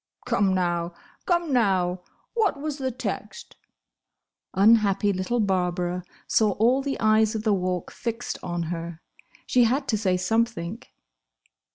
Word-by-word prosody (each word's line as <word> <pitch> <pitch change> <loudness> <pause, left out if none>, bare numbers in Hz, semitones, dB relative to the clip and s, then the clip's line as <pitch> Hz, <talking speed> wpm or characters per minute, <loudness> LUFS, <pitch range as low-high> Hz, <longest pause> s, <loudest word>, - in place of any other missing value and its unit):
"Come, 195 -2 +2
now! 175 -1 -1 0.3
Come, 345 -5 +1
now! 185 -6 +2 0.3
What 415 -11 +1
was 295 0 -4
the 260 -1 -1
text?" 255 +1 -6 1.0
Unhappy 205 -1 +4
little 185 +6 -1
Barbara 180 -3 0 0.2
saw 215 -3 +2
all 245 +7 +3
the 275 0 -3
eyes 215 0 +3
of 215 - -3
the 215 -2 +3
Walk 180 -2 -2
fixed 230 0 -4
on 175 -1 -3
her. 165 -1 -6 0.5
She 245 -2 +4
had 270 +4 0
to 215 - +1
say 185 -3 +1
something. 220 0 -1
210 Hz, 135 wpm, -25 LUFS, 180-240 Hz, 1.0 s, Unhappy